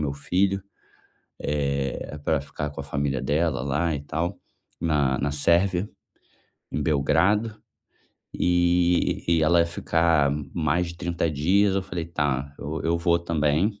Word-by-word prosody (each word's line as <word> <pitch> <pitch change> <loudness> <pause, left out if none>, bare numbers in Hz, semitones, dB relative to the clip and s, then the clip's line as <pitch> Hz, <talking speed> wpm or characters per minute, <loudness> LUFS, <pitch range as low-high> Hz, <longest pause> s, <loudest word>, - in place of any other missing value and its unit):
meu 70 - -1
filho, 95 +6 0 0.9
eh, 70 +1 -2
para 80 -3 +1
ficar 75 +1 -5
com 70 - -7
a 70 - -7
família 70 -2 -1
dela 75 -1 0
lá 75 +5 0
e 70 - -3
tal, 80 +6 -3 0.4
na 70 -5 +1
na 70 - 0
Sérvia, 90 +6 +2 0.8
em 75 - -1
Belgrado. 80 +10 +2 0.8
E 90 0 +2
e 85 -2 +3
ela 85 +2 +4
ia 85 - +3
ficar 80 -3 +2 0.2
mais 85 +2 0
de 85 - -8
30 85 -2 -1
dias, 95 +7 +2
eu 95 - 0
falei: 90 -3 -4
"Tá 70 -4 -1
eu 75 +3 -4
eu 85 +1 +1
vou 85 0 +2
também". 85 +5 0
80 Hz, 145 wpm, -25 LUFS, 70-85 Hz, 0.9 s, ela